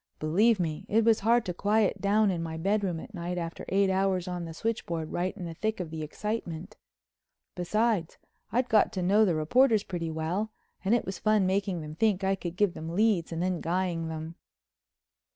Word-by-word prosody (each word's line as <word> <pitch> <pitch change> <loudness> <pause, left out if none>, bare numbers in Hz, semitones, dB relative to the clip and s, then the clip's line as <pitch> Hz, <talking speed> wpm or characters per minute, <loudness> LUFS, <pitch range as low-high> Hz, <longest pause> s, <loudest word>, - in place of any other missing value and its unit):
Believe 200 +8 +3
me, 160 -3 -2
it 220 +1 +3
was 225 -1 +5
hard 230 +2 +3
to 180 - -2
quiet 205 +3 +1
down 205 0 +3
in 170 -2 -2
my 160 -1 -4
bedroom 195 -1 0
at 215 - -11
night 175 -1 -4
after 165 -1 -5
eight 195 0 +3
hours 190 -1 +1
at 180 -1 -3
the - - -6
switchboard 170 -7 -3
right 185 +3 -2
in 180 - -5
the 165 - -5
thick 220 +5 -2
of 170 -4 -4
the 160 -1 -5
excitement. 185 +2 -4 0.8
Besides, 205 0 0 0.3
I'd 250 +2 +1
got 215 -3 +4
to 185 -3 -2
know 205 +4 +5
the 175 -5 +1
reporters 220 - +3
pretty 175 -4 -4
well 165 +7 -2 0.3
and 200 +5 +3
it 240 - 0
was 190 - -5
fun 215 -2 +3
making 190 -2 0
them 155 0 -7
think 195 +2 +1
I 190 0 +2
could 175 -3 -5
give 200 -2 +2
them 165 +1 -6
leads 205 -5 +2
and 165 +1 -2
then 180 -2 -1
guying 170 -1 -1
them. 160 +1 -6
185 Hz, 200 wpm, -28 LUFS, 165-210 Hz, 0.8 s, was